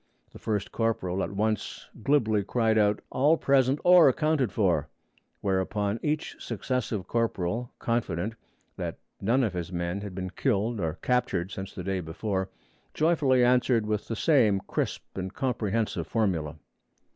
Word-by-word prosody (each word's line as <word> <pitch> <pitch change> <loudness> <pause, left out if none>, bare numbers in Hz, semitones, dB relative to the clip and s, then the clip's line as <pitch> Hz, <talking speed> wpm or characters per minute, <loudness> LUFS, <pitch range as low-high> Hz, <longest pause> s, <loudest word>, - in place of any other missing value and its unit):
The - - -12
first 105 -2 -2
corporal 110 -5 -1
at - - -1
once 105 +1 -2
glibly 110 -6 +2
cried 110 +1 +1
out, 105 -1 +3
'All 150 +5 +3
present 135 -1 +3
or 175 -4 +8
accounted 150 - +1
for'; 85 -8 +1 0.5
whereupon 100 +2 0
each 150 0 -2
successive 115 -3 -3
corporal, 115 0 -1
confident 110 -4 -1 0.4
that - - -4 0.2
none 120 +7 +2
of 105 -5 0
his 85 -1 -4
men 85 +2 -2
had 100 -3 -7
been 95 -1 -4
killed 110 +1 0
or 80 -3 -1
captured 125 -7 0
since 95 -1 -7
the 90 - -5
day 95 0 -1
before, 95 +3 -3 0.5
joyfully 150 -6 +3
answered 125 -2 +3
with 105 -1 -2
the 115 - -3
same 115 -9 +3
crisp - - -2 0.2
and 95 +1 -5
comprehensive 115 -5 -1
formula. 85 -9 0
110 Hz, 145 wpm, -27 LUFS, 95-125 Hz, 0.5 s, or